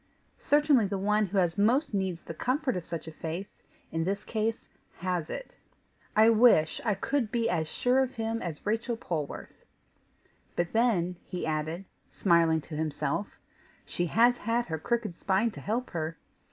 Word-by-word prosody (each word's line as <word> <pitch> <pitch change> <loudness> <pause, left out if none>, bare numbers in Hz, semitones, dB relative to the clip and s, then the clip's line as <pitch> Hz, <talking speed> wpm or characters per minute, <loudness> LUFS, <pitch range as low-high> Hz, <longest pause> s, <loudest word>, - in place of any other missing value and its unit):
Certainly 290 -7 +4
the 195 0 -2
one 210 +2 +2
who 190 -1 +3
most 235 +7 +3
needs 190 -4 -1
the - - -7
comfort 255 - 0
of 180 -2 -4
such 165 -1 -5
a - - -5
faith, 165 +5 -5 0.4
in 165 0 0
this 195 +3 -2
case 220 0 -2 0.3
HAS 180 -3 -2
it. - - -6 0.6
I 215 +1 +7
wish 220 -9 +5
I 210 -4 +1
could 260 -3 -1
be 230 -1 +1
as 160 -8 0
sure 250 +9 +2
of 260 -1 0
him 225 0 -2
as 165 -4 -6
Rachel 225 +3 -1
Polwarth! 155 -9 -5 0.9
But 175 0 -1
then," 195 -7 +2
he 180 - -4
added, 155 +4 -2 0.2
smiling 165 -3 +3
to 155 +1 -8
himself, 155 +4 -2 0.5
"she 175 - -2
has 240 +7 +4
had 235 +2 0
her 160 -1 -2
crooked 220 -1 -1
spine 195 +4 +2
to - - -10
help 235 +5 -2
her! 165 -1 -3
200 Hz, 165 wpm, -29 LUFS, 165-230 Hz, 0.9 s, I